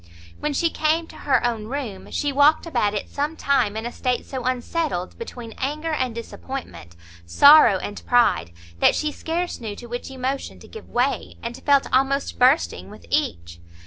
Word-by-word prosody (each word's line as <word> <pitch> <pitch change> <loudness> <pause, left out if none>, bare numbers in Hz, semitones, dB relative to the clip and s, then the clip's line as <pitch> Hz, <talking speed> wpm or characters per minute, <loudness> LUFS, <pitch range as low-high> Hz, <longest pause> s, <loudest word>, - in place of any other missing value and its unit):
When 300 - -1
she 330 +4 +1
came 315 +2 +1
to - - -13
her 260 -3 +4
own 230 -3 -1
room, 235 -6 -5
she 290 - -1
walked 290 +4 +4
about 210 -11 0
it 205 - -3
some 295 +3 -3
time 220 -7 +1
in 220 - -4
a 240 - -3
state 250 0 -2
so 260 -2 -5
unsettled, 255 - -2
between 245 - -8
anger 305 +4 -2
and 255 -6 -1
disappointment, 230 - -8 0.3
sorrow 255 - +7
and 205 +2 -7
pride, 240 - +3 0.3
that - - +5
she 305 -1 -1
scarce 335 0 -3
knew 215 -3 -5
to 240 - -10
which 240 +2 -6
emotion 265 +1 -4
to - - -13
give 445 - -11
way, 250 +3 -1
and 235 +1 -4
felt 280 -1 +3
almost 270 +2 +1
bursting 260 +5 +3
with - - -13
each. 85 - -1
260 Hz, 175 wpm, -23 LUFS, 230-295 Hz, 0.3 s, sorrow